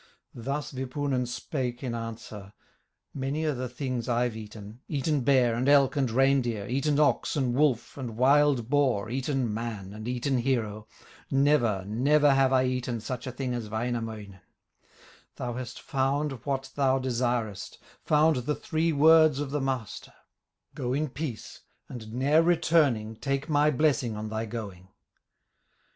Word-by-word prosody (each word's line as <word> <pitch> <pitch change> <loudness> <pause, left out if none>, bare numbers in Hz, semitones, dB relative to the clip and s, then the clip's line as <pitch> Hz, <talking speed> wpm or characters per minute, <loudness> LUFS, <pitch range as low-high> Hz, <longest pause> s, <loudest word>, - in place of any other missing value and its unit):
Thus 135 +5 -4
Wipunen 130 -1 -2
spake 125 0 -4
in 125 -3 -3
answer: 110 -3 -7 0.6
"Many 140 +3 -2
are 155 - +1
the 130 -1 -4
things 125 -1 -4
I've 120 -1 +1
eaten, 105 0 -10
Eaten 145 0 0
bear, 125 -2 +3
and 125 +4 0
elk, 140 -1 +5
and 135 -4 +1
reindeer, 120 -4 +2
Eaten 140 +3 0
ox, 150 +2 +2
and 130 -4 0
wolf, 135 -2 +1
and 120 -4 -6
wild 135 -2 +4
boar, 130 -6 +1
Eaten 130 -3 -1
man, 105 -4 -5
and 110 +2 -8
eaten 125 +1 0
hero, 110 -4 -1 0.4
Never, 135 -9 +2
never 140 +7 +3
have 135 -1 +3
I 130 -1 +3
eaten 125 -2 -2
Such 125 +3 -5
a - - -3
thing 125 0 -3
as 115 -3 -4
Wainamoinen; 110 -3 -4 1.0
Thou 120 -1 -4
hast 120 -1 -6
found 140 +2 -1 0.2
what 135 -1 -2
thou 135 -2 +2
desirest, 120 -5 -2 0.3
Found 155 0 +4
the 130 +4 -1
three 165 +1 -1
words 155 -1 +6
of 145 -2 -3
the 145 0 -1
Master; 130 -5 -4 0.6
Go 125 0 -3
in 150 +2 -1
peace, 135 -4 -6 0.3
and 110 -4 -9
ne'er 140 +6 +3
returning, 155 -10 +2
Take 140 +3 -2
my 150 0 +4
blessing 140 -5 +1
on 110 0 -5
thy 110 +1 -3
going." 100 -5 -7
130 Hz, 150 wpm, -27 LUFS, 115-140 Hz, 1.0 s, words